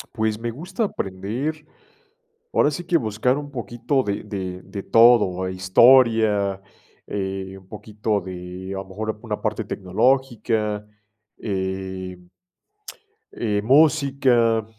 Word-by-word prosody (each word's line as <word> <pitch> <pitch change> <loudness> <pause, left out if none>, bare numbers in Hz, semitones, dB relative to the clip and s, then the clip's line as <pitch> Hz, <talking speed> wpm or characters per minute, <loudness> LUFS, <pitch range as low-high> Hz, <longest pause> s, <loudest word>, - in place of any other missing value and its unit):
Pues, 110 -1 0
me 120 0 -3
gusta 180 - -3
aprender, 125 - -4 0.9
ahora 145 - +3
sí 175 +5 -5
que 170 0 +2
buscar 115 +1 0
un 145 -1 -7
poquito 130 +1 -1
de 100 -1 -2
de 95 -3 -5
de 100 0 -7
todo, 110 -6 +5
historia, 105 0 +4 0.5
eh, 95 -1 -4
un 95 - -19
poquito 105 -1 -3
de, 90 +1 -8
a - - -4
lo 95 - -5
mejor, 110 +2 -4
una 110 -3 -4
parte 110 0 -1
tecnológica, 110 0 0 0.5
eh 95 -2 -4 1.2
eh, 105 -3 -1
música, 135 -5 +3
110 Hz, 115 wpm, -23 LUFS, 95-125 Hz, 1.2 s, todo